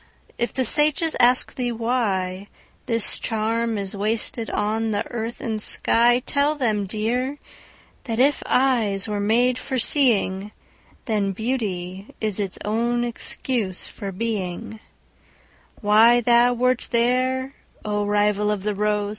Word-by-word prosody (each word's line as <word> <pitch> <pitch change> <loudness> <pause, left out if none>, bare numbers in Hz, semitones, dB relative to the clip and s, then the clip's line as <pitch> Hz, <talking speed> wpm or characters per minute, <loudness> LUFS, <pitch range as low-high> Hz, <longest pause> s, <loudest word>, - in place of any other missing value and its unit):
if 240 - -1
the 260 - 0
sages 305 +5 +3
ask 250 +1 +4
thee 245 -2 -2
whyThis 220 -1 -2
charm 225 0 -1
is 200 0 -3
wasted 220 +2 -1
on 220 +2 -1
the 210 +1 -1
earth 235 0 -5
and 220 -4 -3
sky, 240 +3 +3
Tell 290 +2 +1
them, 215 -8 0
dear, 245 +7 -2 0.7
that 225 -3 -3
if 280 +3 +3
eyes 225 -7 +1
were 210 -1 -3
made 240 +5 +2
for 260 +1 -4
seeing, 215 -6 +2 0.5
Then 205 -4 -1
Beauty 195 -4 -4
is 215 -2 -2
its 195 -2 -3
own 235 +3 0
excuse 235 -4 -2
for 200 -3 -7
being:Why 220 +2 -1
thou 240 +1 +4
wert 250 +1 0
there, 255 +2 0 0.3
O 210 -1 -1
rival 210 0 +1
of 205 -2 -2
the 210 0 -1
rose! 210 0 -1
225 Hz, 125 wpm, -22 LUFS, 205-245 Hz, 0.7 s, ask